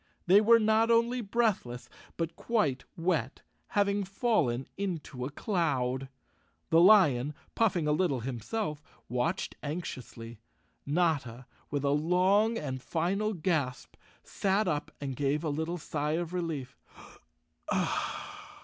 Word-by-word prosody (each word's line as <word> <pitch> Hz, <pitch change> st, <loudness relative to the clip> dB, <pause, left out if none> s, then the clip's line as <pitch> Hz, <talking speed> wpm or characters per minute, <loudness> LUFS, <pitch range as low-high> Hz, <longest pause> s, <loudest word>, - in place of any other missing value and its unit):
They 195 Hz, +4 st, +7 dB
were 230 Hz, +2 st, +7 dB
not 220 Hz, +1 st, +3 dB
only 235 Hz, +2 st, +3 dB
breathless, 200 Hz, -, -1 dB, 0.3 s
but 165 Hz, 0 st, -2 dB
quite 150 Hz, -, 0 dB
wet— 165 Hz, -7 st, -1 dB, 0.3 s
having 200 Hz, 0 st, +2 dB
fallen 190 Hz, -, 0 dB
into 165 Hz, -10 st, -4 dB
a -, -, -3 dB
cloud. 135 Hz, -, -1 dB, 0.6 s
The 165 Hz, +1 st, +6 dB
lion, 150 Hz, -, +5 dB, 0.2 s
puffing 185 Hz, -9 st, +1 dB
a -, -, +3 dB
little 150 Hz, -5 st, +1 dB
him¬ 120 Hz, -1 st, -4 dB
self, 155 Hz, -, -3 dB, 0.3 s
watched 125 Hz, +9 st, -1 dB
anxiously. 125 Hz, -7 st, -6 dB, 0.5 s
Notta, 145 Hz, -7 st, 0 dB, 0.2 s
with 145 Hz, -1 st, -2 dB
a 140 Hz, -, +2 dB
long 185 Hz, +9 st, +3 dB
and 130 Hz, -, -4 dB
final 195 Hz, +8 st, -1 dB
gasp, 155 Hz, -7 st, -1 dB, 0.3 s
sat 195 Hz, +1 st, 0 dB
up 150 Hz, -3 st, -1 dB
and 135 Hz, -2 st, -4 dB
gave 145 Hz, +3 st, 0 dB
a 160 Hz, -, -1 dB
little 160 Hz, +4 st, -2 dB
sigh 150 Hz, -2 st, -2 dB
of 170 Hz, +1 st, -2 dB
relief. 165 Hz, -7 st, -3 dB
165 Hz, 120 wpm, -30 LUFS, 135-200 Hz, 0.6 s, They